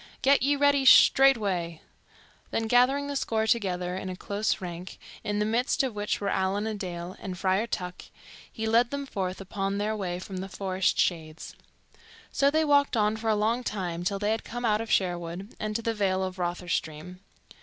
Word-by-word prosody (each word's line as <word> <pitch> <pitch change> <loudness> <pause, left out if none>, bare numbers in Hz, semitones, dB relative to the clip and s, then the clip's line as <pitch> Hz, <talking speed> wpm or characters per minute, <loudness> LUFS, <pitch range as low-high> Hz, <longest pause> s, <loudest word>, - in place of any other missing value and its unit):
"Get 275 +1 +5
ye 285 +2 +3
ready 285 -1 +3
straightway." 205 -12 +5 0.7
Then 225 - -1
gathering 250 +5 +3
the 285 0 -4
score 220 -4 0
together 180 -5 0
in 190 0 -5
a 185 - -5
close 205 +3 -1
rank, 180 0 -7 0.3
in 205 0 -2
the 210 - +1
midst 245 +5 +1
of 260 -4 -2
which 210 0 -2
were 200 - -3
Allan 190 +2 0
a 220 - -2
Dale 180 -3 -6
and 185 -2 -6
Friar 190 +4 +1
Tuck, 180 -4 -5 0.5
he 220 - -4
led 230 +2 +3
them 280 +1 -4
forth 190 -7 -4
upon 195 0 -3
their 210 +1 -1
way 180 -4 -3
from 185 +1 -7
the 190 +1 -5
forest 190 -1 -1
shades. 160 -2 -2 0.8
So 280 - +3
they 315 +2 +2
walked 285 -4 +3
on 210 0 +2
for 220 0 -3
a 215 - +3
long 225 +4 0
time 175 -6 -3
till 200 +3 -1
they 205 +2 0
had 225 - -1
come 240 +1 -5
out 215 -1 +2
of 225 - -6
Sherwood 175 +1 -1
and 215 0 -3
to 230 - -2
the 230 - 0
vale 190 -3 0
of 185 0 -5
Rotherstream. 175 -1 -3
205 Hz, 195 wpm, -27 LUFS, 185-230 Hz, 0.8 s, Get